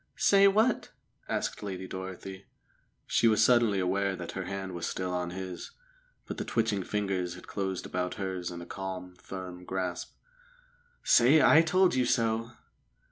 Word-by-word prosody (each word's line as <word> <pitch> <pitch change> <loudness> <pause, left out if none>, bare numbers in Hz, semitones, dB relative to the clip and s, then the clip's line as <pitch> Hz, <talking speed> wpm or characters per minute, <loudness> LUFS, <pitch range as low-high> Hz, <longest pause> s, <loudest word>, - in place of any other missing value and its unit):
"Say 200 0 +6
what?" 215 +4 +2 0.4
asked - - -2
Lady 95 -2 -5
Dorothy. 95 +1 -7 0.6
She 115 - +3
was 110 -1 +4
suddenly 120 -5 +4
aware 95 +1 0
that 85 -2 -6
her 95 -1 -5
hand 95 0 -4
was 85 -1 -3
still 90 -1 -3
on 90 -1 -2
his, 95 0 -7 0.5
but - - -6
the - - -1
twitching 110 -4 0
fingers 95 -3 -2
had 90 - -12
closed 95 -2 -3
about 90 0 -3
hers 95 -3 -3
in 85 -1 -7
a - - -8
calm, 95 -1 -6
firm 90 -1 -8
grasp. 90 -1 -4 0.9
"Say 130 +6 +6
'I 155 - +7
told 180 +3 +3
you 130 -1 +2
so'!" 115 -1 0
95 Hz, 155 wpm, -29 LUFS, 90-115 Hz, 0.9 s, I